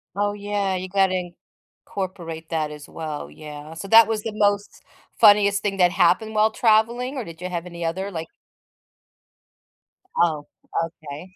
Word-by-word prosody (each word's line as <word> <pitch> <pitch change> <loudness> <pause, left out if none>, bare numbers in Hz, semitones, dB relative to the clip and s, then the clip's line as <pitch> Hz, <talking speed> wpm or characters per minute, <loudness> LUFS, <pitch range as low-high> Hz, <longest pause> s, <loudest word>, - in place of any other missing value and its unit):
Oh 205 0 0
yeah, 205 -1 -2
you 185 0 -4
got 195 0 +3
to 180 -2 -3 0.5
incorporate 170 -4 -6
that 155 -2 -1
as 150 -1 -10
well. 155 -2 -6
Yeah. 150 0 -10
So 195 - -7
that 225 +2 +8
was 220 -1 -2
the 225 -2 -4
most 205 -1 0 0.4
funniest 205 -1 +6
thing 195 -1 -1
that 180 -1 +4
happened 195 +5 +2
while 215 +1 +4
traveling 235 +4 +2
or 260 - -3
did 165 -3 -11
you 180 - -3
have 175 -1 -4
any 170 -1 -6
other 190 +4 -3
like 165 -2 -5 1.9
Oh, 160 -3 +1 0.4
okay. 160 +3 -10
185 Hz, 160 wpm, -23 LUFS, 165-205 Hz, 1.9 s, that